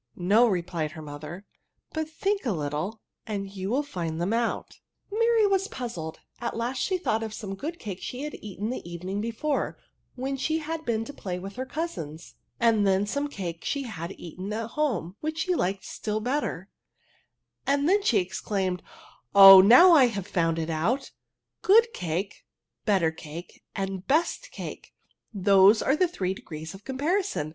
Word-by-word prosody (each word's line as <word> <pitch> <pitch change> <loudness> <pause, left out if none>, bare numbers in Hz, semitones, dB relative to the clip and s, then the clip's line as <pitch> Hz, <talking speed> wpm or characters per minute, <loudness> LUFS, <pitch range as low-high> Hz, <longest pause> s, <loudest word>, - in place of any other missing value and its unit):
'* - - -58
" - - -42 0.2
No," 240 +2 +7
replied 170 -5 -2
her 160 - -8
mother; 150 +6 -8 0.2
" - - -40
but 315 -1 -2
think 395 +5 -1
a 235 - 0
little, 155 +7 -3 0.3
and 200 -2 -4
you 190 0 -3
will 265 +6 +1
find 170 - -4
them 180 +5 0
out." 235 0 -2 0.3
Mary 460 0 +3
was 390 -1 +2
puzzled; 225 - -6 0.2
at 235 -1 -3
last 245 +3 -2
she 375 - +1
thought 225 -11 0
of 220 -1 -4
some 205 -3 -5
good 310 - -5
cake 195 - -7
she 255 +3 -5
had 300 - -5
eaten 210 +2 -4
the 255 - -4
evening 185 +4 -4
before, 230 +7 -2 0.4
when 265 +2 -3
she 315 +4 0
had 320 0 -4
been 225 -1 0
to 285 - -8
play 185 -9 -5
with 195 +2 -8
her 260 +1 -4
cousins, 170 - -5 0.3
and 225 -3 +3
then 190 0 +3
of 205 - -4
some 285 +4 -1
cake 175 - -6
she 280 -1 -1
had 195 -7 -6
eaten 185 +4 -7
at 225 +1 -4
home, 215 - -1
which 310 +1 -3
she 365 +2 +1
liked 195 - -1
still 215 0 -3
better; 245 - -2 1.0
and 280 +1 +2 0.2
she 235 - +3
then 185 - +2
exclaimed, 185 -1 -2
<^ - - -32 0.5
Oh, 195 -1 +12
now 250 - +8
I 295 -6 +8
have 205 -5 -3
ADJECnVESV - - -16
SS - - -22
found 165 -2 +2
it 165 0 -2
out» 210 - -1 0.3
— - - -59
good 460 +4 +5
cake, 180 +4 -3 0.4
better 190 -7 +3
cake, 160 +2 -10
and 195 -1 -4
best 335 - +1
cake, - - -8 0.4
those 200 +1 +5
are 270 - +3
the 365 +3 +3
three 190 - -2
degrees 160 -3 -8
of 195 +1 -12
comparison. 295 - -1
210 Hz, 190 wpm, -27 LUFS, 180-280 Hz, 1.0 s, Oh